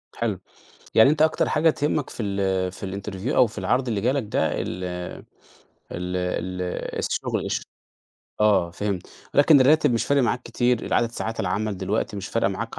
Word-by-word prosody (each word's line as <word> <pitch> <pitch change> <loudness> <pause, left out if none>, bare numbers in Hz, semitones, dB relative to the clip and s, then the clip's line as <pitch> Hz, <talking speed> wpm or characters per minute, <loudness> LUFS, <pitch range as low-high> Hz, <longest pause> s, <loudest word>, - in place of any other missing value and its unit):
حلو. 110 -6 -2 0.6
يعني 110 +5 +7
أنت 155 +1 +2
أكتر 155 0 +2
حاجة 160 +2 +3
تهمّك 150 -2 -1
في - - -5
ال 95 -2 0
في 95 0 -7
الinterview 105 +6 -4
أو 125 - +6
في 110 -1 -9
العرض 125 +7 0
اللي 110 -4 0
جالك 130 +6 +1
ده 105 - 0
ال 90 +1 -4 1.1
ال 90 +1 -3
ال 90 0 -2 0.4
الشُغل، - - -1
الش - - -1 0.8
آه، 100 -5 +3
فهمت. 100 0 -3 0.3
لكن 145 0 +6
الراتب 145 0 +5
مش 115 - +1
فارق 140 -1 +3
معاك 125 0 0
كتير، 120 0 0
العدد 115 - +1
ساعات 115 -1 -4
العمل 105 -1 -1
دلوقتي 100 +3 -2
مش 100 -1 -5
فارقة - - +1
معاك - - -5
110 Hz, 170 wpm, -24 LUFS, 95-125 Hz, 1.1 s, يعني